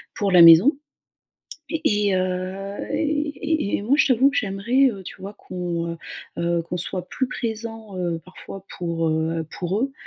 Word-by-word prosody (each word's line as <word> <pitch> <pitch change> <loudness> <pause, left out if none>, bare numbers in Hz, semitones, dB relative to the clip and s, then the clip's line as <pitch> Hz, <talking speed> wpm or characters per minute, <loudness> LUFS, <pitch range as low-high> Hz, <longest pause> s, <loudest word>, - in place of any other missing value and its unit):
pour 200 -2 0
la 180 -1 +7
maison 170 - +8 0.9
et 320 -1 -2 0.3
et 195 - +2
heu, 185 +2 -3 0.2
et 300 -1 0 0.2
et 305 -9 0
et - - -6
moi 245 +7 +2
je 315 - +4
t'avoue 265 +2 +4
que 280 - -4
j'aimerais, 235 +7 +2
heu, 195 -2 -9
tu - - -8
vois 200 +2 -7
qu'on, 170 -2 -4
heu - - -7 0.4
heu, 170 0 0
qu'on 170 +2 -5
soit 180 0 -3
plus 260 - -1
présent, 225 -3 -5
heu, 170 -2 -2
parfois 190 +1 -11
pour, 170 -2 -1
heu, 160 +1 -1
pour 185 +4 -2
eux, 270 +2 -1
195 Hz, 180 wpm, -23 LUFS, 175-235 Hz, 0.9 s, maison